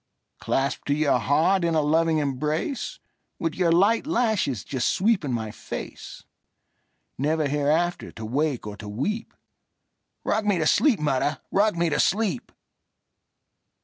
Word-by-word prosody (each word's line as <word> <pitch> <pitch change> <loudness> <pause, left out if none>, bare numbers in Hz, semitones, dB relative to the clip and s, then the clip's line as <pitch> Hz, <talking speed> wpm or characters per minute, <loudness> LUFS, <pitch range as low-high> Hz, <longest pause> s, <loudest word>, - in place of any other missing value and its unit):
Clasped 135 -1 -1
to 145 - +2
your 150 -2 +2
heart 170 +6 +2
in 170 -1 +1
a 155 - +3
loving 160 +2 +2
embrace, 150 - -2 0.4
With 165 -1 -2
your 175 -2 +1
light 205 - +3
lashes 220 - 0
just 130 -3 -2
sweeping 190 - +1
my 110 -3 -2
face, - - -8 1.0
Never 155 +2 +1
hereafter 150 +5 0
to 110 - -7
wake 140 +2 -1
or 105 -1 -6
to 105 - -8
weep;—Rock 215 - -5
me 205 -3 +2
to 160 - 0
sleep, 265 - +3
mother,—rock 150 +8 0
me 170 -1 +1
to 145 - 0
sleep! 195 - 0
155 Hz, 130 wpm, -25 LUFS, 140-190 Hz, 1.0 s, a